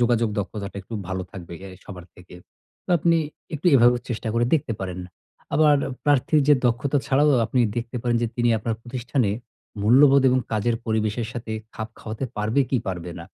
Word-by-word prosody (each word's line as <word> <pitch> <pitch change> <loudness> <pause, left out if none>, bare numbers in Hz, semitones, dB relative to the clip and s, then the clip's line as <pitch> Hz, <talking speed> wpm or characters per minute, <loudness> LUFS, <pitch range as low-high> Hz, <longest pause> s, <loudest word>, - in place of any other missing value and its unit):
যোগাযোগ 120 -1 +2
দক্ষতাটা 100 0 -5
একটু 115 - -9
ভালো 95 -1 -2
থাকবে 90 -3 -9
এ - - -7
আই 95 - -11
সবার 90 -4 -9
থেকে। 90 0 -14 0.5
তো - - -7
আপনি 170 +2 +3 0.4
একটু 150 +5 -3
এভাবে 120 -1 +6
চেষ্টা 120 -2 -3
করে 120 0 +2
দেখতে 135 -6 0
পারেন। 90 -1 -4 0.6
আবার 150 -1 +5 0.3
প্রার্থীর 145 +1 +3
যে 145 - +8
দক্ষতা 130 +4 +1
ছাড়াও 145 +2 +3 0.2
আপনি 125 +3 +1 0.2
দেখতে 120 +1 -4
পারেন 120 -1 +1
যে, - - +2
তিনি 120 0 +2
আপনার 110 +1 -2
প্রতিষ্ঠানে 125 -2 -1 0.5
মূল্যবোধ 135 +5 +6
এবং 130 - +3
কাজের 115 +2 +1
পরিবেশের 110 +1 -1
সাথে 115 -2 -6 0.2
খাপ 110 0 -5
খাওয়াতে 110 +4 -5
পারবে 110 +6 +1
কি 135 - +2
পারবে 90 -2 -4
না? 85 - -8
120 Hz, 180 wpm, -24 LUFS, 105-130 Hz, 0.6 s, যে